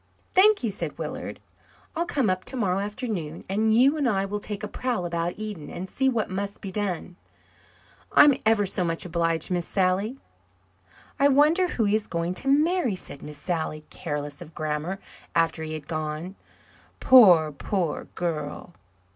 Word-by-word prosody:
"Thank 410 -2 +5
you," 225 - +1
said - - -4
Willard. - - -5 0.6
"I'll 340 +2 -1
come 275 -8 +1
up 185 -1 0
tomorrow 200 -8 -1
afternoon, 200 -6 -4
and 215 +3 +1
you 255 +6 +5
and 280 -5 +2
I 195 -3 +1
will 205 +1 -3
take 205 0 -6
a - - -2
prowl 240 -4 -2
about 170 0 -2
Eden 210 -8 -6
and 185 - -6
see 265 +6 +1
what 230 -4 0
must 200 +2 -4
be 195 - -6
done. 180 -3 -3 0.9
I'm 295 -1 +7
ever 220 -2 +3
so 190 0 -1
much 165 +1 -2
obliged, 165 -1 -1
Miss 175 -1 -1
Sally." 195 +6 0 1.0
"I 280 - +6
wonder 300 +6 +4
who 240 - -1
he 205 +1 +3
is 215 -1 -1
going 170 +1 -2
to 270 - -7
marry," 300 - +3
said 145 - -8
Miss 150 -1 -9
Sally, 155 -1 -3
careless 145 -2 -5
of 165 -2 -11
grammar, 155 +4 -2 0.4
after 165 -1 +2
he 155 0 -4
had 155 -3 -7
gone. 155 +3 -4 0.7
"Poor, 180 -12 +7
poor 170 +3 -2
girl!" 165 0 -4
190 Hz, 165 wpm, -26 LUFS, 165-225 Hz, 1.0 s, I'm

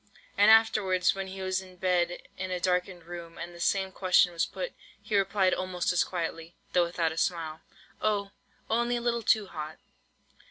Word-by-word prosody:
And 205 - +6
afterwards, 215 -5 +4
when 195 0 -4
he 190 0 -6
was 185 0 0
in 185 -1 -14
bed 175 -1 0
in 185 0 -4
a 180 -1 -2
darkened 180 0 -1
room, 170 0 -9
and 175 +1 -7
the 170 - -12
same 190 +2 +1
question 185 -2 +3
was 165 - 0
put, - - -5 0.3
he 215 - -3
replied 195 -1 +3
almost 185 -1 -1
as 175 - +3
quietly, 165 -1 -4 0.2
(though 175 -1 +4
without 170 -1 0
the 160 - -7
smile,) 160 -3 -1 0.4
"Oh—only 215 +3 -1
a 240 - -2
little 235 0 0
too 215 -1 +3
hot." 155 -3 -7
185 Hz, 175 wpm, -29 LUFS, 175-195 Hz, 0.4 s, And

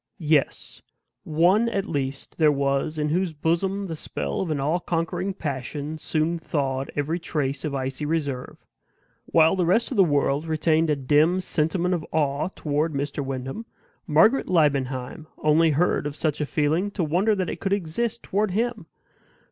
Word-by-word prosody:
Yes; 155 -5 0 0.4
one 180 +9 +3
at 200 -3 -1
least 140 -5 -4
there 155 -2 +5
was 140 +2 0
in 150 0 0
whose 175 +1 0
bosom 185 +6 0
the 165 -4 -4
spell 70 - -3
of 155 -6 -1
all 155 +6 +1
conquering 170 +3 -2
passion 145 0 -4
soon 160 +2 -1
thawed 135 -4 -2
every 155 +4 -1
trace 145 -5 -2
of 150 -3 -2
icy 135 +2 -3
reserve. 145 -5 -3 0.6
While 160 +2 +4
the 185 - +1
rest 225 +9 +2
of 255 - -3
the 195 - +7
world 145 -1 +1
retained 160 0 +2
a 150 - +3
dim 150 +6 +3
sentiment 175 +1 0
of 170 -3 -1
awe 145 -1 0
toward 155 +1 -1
Mr. 140 +1 -2
Wyndham, 135 - -5 0.4
Margaret 215 - +4
Liebenheim 145 -3 0
only 155 +2 +3
heard 155 0 +1
of 145 - -6
such 150 -1 -1
a 150 - -1
feeling 155 +7 +1
to 200 -3 -2
wonder 185 +8 +2
that 185 -3 -2
it - - -6
could 195 - -2
exist 205 +5 -1
toward 210 +2 0
HIM. 225 -1 -2
155 Hz, 165 wpm, -24 LUFS, 145-180 Hz, 0.6 s, the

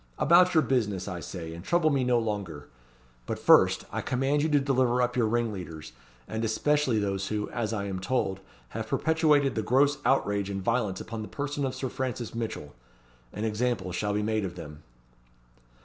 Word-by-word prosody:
About 180 +1 +5
your 160 - +5
business, 105 -8 0
I 90 - -4
say, 85 -2 -7
and 85 +1 -9
trouble 165 - +2
me 135 -2 +1
no 125 -1 +3
longer! 100 -10 -4 0.6
But - - -2
first, - - +5
I - - -2
command 135 +3 0
you 155 - +1
to 145 -1 +4
deliver 130 -3 +1
up 125 0 +1
your 120 -3 +2
ringleaders, 95 - -3 0.4
and 110 +1 -3
especially 130 +3 +1
those 100 -2 -1
who, 105 -1 -3
as 115 -2 -2
I 100 -3 -2
am 95 -2 -4
told, 95 -2 -1 0.3
have - - -5
perpetrated 150 -4 +2
the 110 - -1
gross 140 +6 +2
outrage 100 -7 +1
and 95 -1 -4
violence 105 -4 0
upon 115 -1 -6
the 105 - -6
person 145 0 -3
of 130 - -5
Sir 130 0 -3
Francis 125 -3 -4
Mitchell. 115 -10 -5 0.6
An 105 - -5
example 110 -3 -1
shall 105 +3 -1
be 105 - 0
made 110 0 0
of 90 -3 -4
them." 75 0 -9
115 Hz, 185 wpm, -28 LUFS, 100-135 Hz, 0.6 s, About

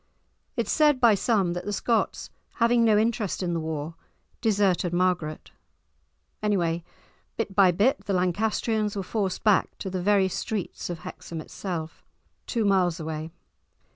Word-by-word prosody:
It - - +1
is - - -3
said 300 -3 +4
by 235 -3 +6
some 200 -4 +1
that 175 +1 -4
the 205 - -2
Scots, 225 +2 -1 0.2
having 235 0 +3
no 220 -2 +5
interest 215 -3 0
in 175 -1 -1
the 165 - 0
war, 160 0 -4 0.5
deserted 195 -5 +2
Margaret; 175 -4 -1 0.9
anyway, 175 -5 0 0.5
bit 195 - -2
by 195 -2 +6
bit 215 +11 +2
the 200 - -1
Lancastrians 210 +3 0
were 195 - -2
forced 195 -1 -2
back, 210 -3 +2
to 190 - -5
the 185 -1 -2
very 200 0 +3
streets 195 0 -4
of 170 -2 -5
Hexham 165 - -7
itself, 165 -1 -6 0.4
two 230 -3 0
miles 185 -4 +2
away. 160 0 -5
195 Hz, 150 wpm, -26 LUFS, 175-215 Hz, 0.9 s, by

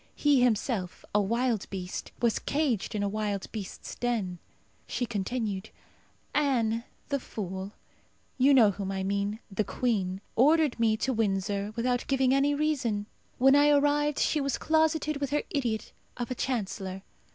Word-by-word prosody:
He 290 -3 +4
himself, 220 -5 0
a 210 - +4
wild 235 +1 0
beast, 185 -2 -5
was 235 -2 +3
caged 275 -10 -1
in 205 - 0
a - - +1
wild 205 -1 -2
beast's 205 -4 -6
den. 215 -8 -2 0.5
She 245 - -1
continued, 210 -2 -3 0.6
"Anne, 235 -6 +1 0.2
the 280 -1 0
fool 190 -3 -6 0.7
you 270 +3 +6
know 235 -7 +7
whom 195 0 -4
I 190 -1 -2
mean 200 +3 -1
the 195 +2 0
queen 195 -4 -1 0.2
ordered 295 +1 +4
me 220 -1 +3
to 260 +3 0
Windsor 200 -2 0
without 245 +1 0
giving 265 -1 +3
any 280 +1 +3
reason. 265 -9 0 0.3
When 270 +2 +6
I 290 +1 +6
arrived 290 0 +3
she 305 - +2
was 275 -1 0
closeted 315 -1 +1
with 280 -1 -2
her 295 +2 0
idiot 235 -6 -2 0.2
of 245 +1 -4
a - - +2
Chancellor. 195 -7 -3
235 Hz, 150 wpm, -29 LUFS, 200-275 Hz, 0.7 s, know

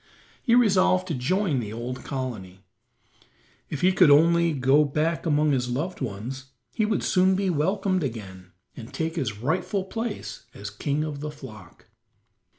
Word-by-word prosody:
He 235 -3 +3
resolved 185 -5 +3
to - - -1
join 155 +3 0
the 105 -3 -5
old 120 +3 -5
colony. 105 -9 -6 1.0
If 145 - -4
he 185 - +5
could 185 -4 +5
only 170 +3 +5
go 140 +1 +4
back 155 +3 -1
among 150 -1 +3
his 125 -2 0
loved 155 +9 -3
ones 125 +4 -5 0.3
he 220 - +1
would 210 -2 0
soon 185 +1 +3
be 190 -1 0
welcomed 185 +4 0
again 95 -8 -7 0.2
and 115 -1 -10
take 160 +1 -3
his 120 -11 -2
rightful 170 - -1
place 225 +3 -5
as 100 0 -7
king 145 +8 -2
of 150 -2 -5
the 150 +1 -4
flock. 130 -8 -12
150 Hz, 155 wpm, -25 LUFS, 125-185 Hz, 1.0 s, he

